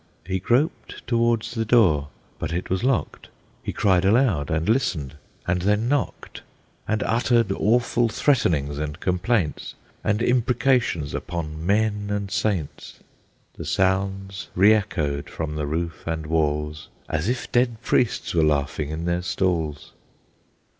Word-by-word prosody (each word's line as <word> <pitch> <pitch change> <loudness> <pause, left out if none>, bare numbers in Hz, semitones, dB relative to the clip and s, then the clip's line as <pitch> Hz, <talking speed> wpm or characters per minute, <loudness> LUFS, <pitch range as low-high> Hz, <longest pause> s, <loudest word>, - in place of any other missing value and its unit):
He 95 +1 -1
groped 125 - -1
towards 115 -1 +1
the 115 -2 -1
door, 95 -11 +4 0.3
but - - -3
it 90 +2 -3
was 95 +3 0
locked; 130 -3 -1 0.3
He - - -4
cried 95 -4 +2
aloud, 100 - +3
and 80 +1 0
listened, 80 - 0 0.3
and 90 0 0
then 105 +4 +1
knocked, 145 0 -2 0.5
And 110 0 0
uttered 115 -2 +2
awful 115 +3 +2
threatenings 85 - +1
and 75 +1 -4
complaints, 90 -2 -1 0.3
And 105 +2 +1
imprecations 120 - +1
upon 80 -2 -4
men 105 +2 +1
and 100 -1 -2
saints. 90 -10 -2 0.5
The - - -8
sounds 95 0 -1
re 100 +4 +6
echoed 80 -9 -1
from 80 -2 -4
the 75 -1 -2
roof 85 +2 -3
and 80 -1 -2
walls 75 -1 -1 0.2
As 80 +7 -1
if 125 0 -3
dead 120 -2 +2
priests 120 - +1
were 85 - +3
laughing 75 0 0
in 80 +2 -4
their 85 0 0
stalls! 80 -5 -1
95 Hz, 135 wpm, -24 LUFS, 80-115 Hz, 0.5 s, re